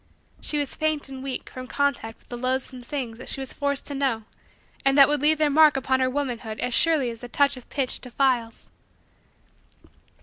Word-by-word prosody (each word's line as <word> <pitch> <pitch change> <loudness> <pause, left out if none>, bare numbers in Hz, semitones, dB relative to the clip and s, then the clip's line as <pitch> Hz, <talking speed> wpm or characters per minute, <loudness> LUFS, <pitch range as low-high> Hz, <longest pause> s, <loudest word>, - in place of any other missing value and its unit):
She 300 - -1
was 290 -2 -2
faint 310 -3 -1
and 265 -1 -8
weak 265 -1 -5
from 255 0 -8
contact 280 -6 -1
with - - -28
the 245 - -5
loathsome 255 +1 -2
things 245 -3 -5
that - - -7
she - - 0
was 265 -1 -6
forced 280 -1 -1
to 285 - -2
know 265 -5 0 0.6
and 275 +1 +3
that 275 -1 +9
would 295 -2 +1
leave 310 +1 +4
their 300 -1 +2
mark 305 -1 +6
upon 260 0 +1
her 260 0 +2
womanhood 245 -5 -3
as 245 0 -2
surely 295 -4 +3
as 230 - -11
the 245 - -8
touch 280 +2 +2
of 255 - -13
pitch 270 -3 -2
defiles. 250 -2 -1
265 Hz, 200 wpm, -25 LUFS, 250-285 Hz, 0.6 s, that